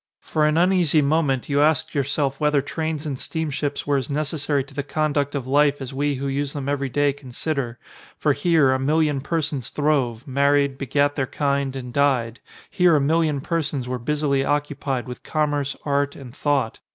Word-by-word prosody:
For 155 -1 +1
an 155 +1 +1
uneasy 175 -4 +3
moment 140 -3 +1
you 145 0 +2
asked 155 -1 +2
yourself 140 -1 -1
whether 150 -1 +3
trains 160 0 -3
and 140 -4 -3
steamships 150 -3 -3
were 145 -1 +2
as 130 - -3
necessary 145 -1 -1
to 140 +1 -17
the 145 - -2
conduct 145 -1 -1
of 135 -3 -3
life 145 +2 +3
as 135 -1 -6
we 145 +1 0
who 135 +1 -4
use 140 0 -1
them 140 -2 -4
every 140 -1 -1
day 145 +2 +2
con 135 -2 -13
sider; 130 -3 -3 0.4
for 150 - +2
here, 145 -1 +3
a 130 - +1
million 150 0 +1
persons 145 -5 -2
throve, 135 -6 0
married, 140 0 +2
begat 145 +2 +1
their 135 -2 -1
kind, 140 -1 -1
and 125 -2 -6
died; 130 -5 +1 0.3
here 180 -3 +4
a - - +4
million 150 0 +1
persons 145 -5 -2
were 125 0 -3
busily 140 +1 0
occupied 145 -3 -1
with 125 - -7
commerce, 145 -3 -1
art, 140 -1 0
and 130 -2 -11
thought. 140 -7 0
145 Hz, 185 wpm, -23 LUFS, 135-150 Hz, 0.4 s, here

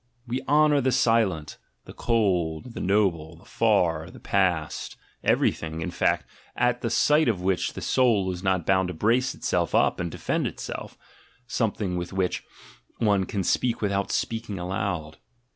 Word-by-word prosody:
We 125 +1 -3
honour 150 0 +4
the 130 0 +1
silent, 105 -12 +1 0.3
the - - -11
cold, 100 -2 0
the - - -6
noble, 90 -5 +1
the 85 - -19
far, 85 -8 +1
the - - -13
past, 90 -6 -1 0.3
everything, 80 0 +1
in - - -3
fact, - - +1 0.3
at 125 0 +1
the 115 - -1
sight 150 +6 +3
of 100 -6 0
which 95 -1 0
the - - -7
soul 110 -8 +2
is 90 -1 -6
not 95 -3 0
bound 95 -1 +2
to 90 - -5
brace 120 +9 +1
itself - - -1
up - - +3
and 90 -1 -2
defend - - -1
itself - - -7 0.2
— 125 - -31
something 105 -6 -1
with 90 +1 -5
which 95 -1 -1 0.5
one 100 -4 +2
can 100 -2 -2
speak 120 +6 +1
without 100 -1 -1
speaking 110 -3 -2
aloud. 90 -4 -3
100 Hz, 160 wpm, -26 LUFS, 90-115 Hz, 0.5 s, honour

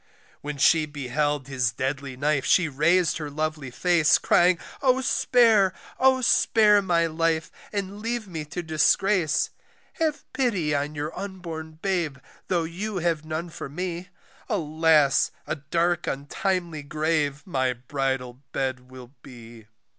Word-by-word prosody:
When 145 0 -5
she 155 +2 +4
beheld 145 0 -2
his 130 -4 0
deadly 135 +2 -4
knife 145 0 +1
she 180 -3 +3
rais'd 155 +4 +2
her 150 -2 -5
lovely 155 -2 -3
face, 165 +3 +3
Crying, 180 0 +3 0.2
Oh! 260 -1 +3
spare, 225 -7 +3 0.2
Oh! 260 0 +4
spare 210 -3 +4
my 170 -3 +2
life 165 0 0 0.2
and 200 0 -4
leave 230 0 -3
me 165 -4 -5
to 175 +4 -5
disgrace, 160 +2 +2 0.5
Have 315 -2 -1
pity 200 - 0
on 145 +1 -2
your 150 +2 -4
unborn 170 -5 -7
babe 175 -8 -1 0.3
tho' 175 -3 +1
you 190 +5 -4
have 165 -3 0
none 160 +2 -4
for 140 - -7
me; 180 +3 -5 0.4
Alas! 155 -3 +3 0.2
a - - -3
dark 170 +4 0
untimely 170 +3 -2
grave, 150 -1 -1
my 130 -7 0
bridal 130 0 -3
bed 130 -1 -3
will 130 -1 -12
be. 115 -3 -13
160 Hz, 135 wpm, -25 LUFS, 140-180 Hz, 0.5 s, she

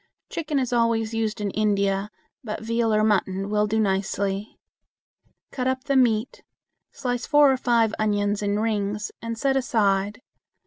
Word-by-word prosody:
Chicken 305 -3 -2
is 255 -2 -1
always 230 -1 +1
used 225 -1 -1
in 205 -1 -2
India, 200 -1 0 0.3
but 220 -1 -5
veal 230 0 0
or 215 0 +3
mutton 195 -1 0
will 210 0 +2
do 220 +1 0
nicely. 195 0 -1 0.9
Cut 255 -1 -2
up 260 0 -1
the 280 -1 0
meat, 235 -2 +2 0.5
slice 245 -1 -3
four 290 -2 +6
or 265 - +1
five 230 -3 +2
onions 205 -1 0
in 205 0 0
rings, 210 -1 -1
and 230 0 -4
set 270 +3 +1
aside. 210 -4 0
215 Hz, 150 wpm, -24 LUFS, 205-240 Hz, 0.9 s, four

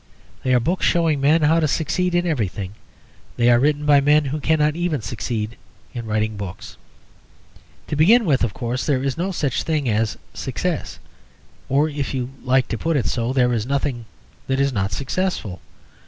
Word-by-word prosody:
They 130 - -1
are - - +5
books 170 +10 -1
showing 165 -5 +2
men 155 +3 +4
how 160 +2 +4
to 155 - +2
succeed 175 +4 0
in 175 0 +2
everything; 105 - -2 0.6
they 120 +1 +4
are 120 - +5
written 150 +2 +1
by 145 -1 +5
men 150 +1 +4
who 140 +3 -2
cannot 150 0 +2
even 175 -4 -1
succeed 110 0 -4 0.4
in 120 -2 -5
writing 110 0 -1
books. 100 -4 -7 1.1
To - - -3
begin 215 +11 +5
with, 140 -7 +2
of 120 - +1
course, 120 +5 -3
there 135 -3 0
is 135 -2 -1
no 180 +4 -2
such 145 -8 -1
thing 155 -4 -1
as 110 -1 0 0.2
Success. - - -3 0.7
Or, 145 +3 +3
if 145 -3 -3
you 125 0 -3
like 130 0 +2
to 115 - -3
put 165 -2 0
it 120 - 0
so, 120 0 -1
there 125 -2 +2
is 115 0 -1
nothing 135 -4 -1 0.4
that 135 0 0
is 140 -1 +2
not 100 -2 -1
successful. 135 - -2
135 Hz, 185 wpm, -21 LUFS, 120-155 Hz, 1.1 s, are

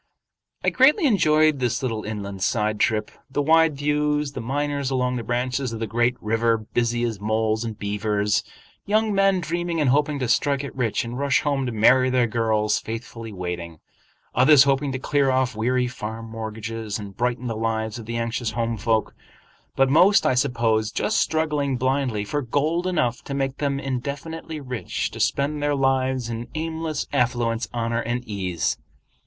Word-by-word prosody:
I - - +2
greatly 295 +7 +5
enjoyed 155 - +4
this 125 0 -1
little 115 -4 -2
inland 100 -3 -5
side 105 +1 0
trip—the 110 +6 -1
wide 160 -1 +4
views; 150 0 0
the 130 - -6
miners 140 +2 -1
along 125 -1 0
the 120 - -3
branches 125 +2 -1
of 115 - -5
the 115 - -1
great 120 +2 +1
river, 115 +1 +1
busy 120 +2 -1
as 115 -4 -2
moles 110 +1 0
and 115 -2 -5
beavers; 105 0 0 0.4
young 215 +1 +2
men 195 -1 +3
dreaming 170 +1 -2
and 140 -4 +3
hoping 145 +1 +2
to 130 -3 -2
strike 140 +3 +1
it 140 - -7
rich 120 -3 0
and 120 +2 -5
rush 140 -2 +2
home 140 -3 0
to - - -2
marry 125 +4 +4
their 125 -1 +3
girls 110 -2 +1
faithfully 115 0 -7
waiting; 90 -3 -5 0.6
others 135 +3 +7
hoping 140 0 +1
to 130 - -2
clear 140 +1 +1
off 130 -2 +1
weary 125 +3 +1
farm 115 -2 -6
mortgages, 110 -1 -5
and 100 -2 -9
brighten 125 +2 -1
the 115 -2 -2
lives 110 0 -2
of 110 - -10
the 115 0 -3
anxious 115 0 -2
home 115 -1 -1
folk; 110 +1 0 0.6
but 135 - +4
most, 180 +9 +5
I - - +3
suppose, 115 -4 +1
just 220 - 0
struggling 150 -4 0
blindly 130 -4 0
for 145 +7 -2
gold 155 +8 0
enough 125 -10 0
to 140 - -4
make 135 -1 -1
them 140 -2 -1
indefinitely 145 +5 -5
rich 125 -4 -3
to - - -9
spend 145 +1 0
their 145 0 +1
lives 130 -2 +1
in 115 0 -5
aimless 160 -1 -3
affluence, 120 -3 0
honor, 115 0 -1
and 120 +1 -3
ease. 95 -5 -2
125 Hz, 170 wpm, -23 LUFS, 115-145 Hz, 0.6 s, others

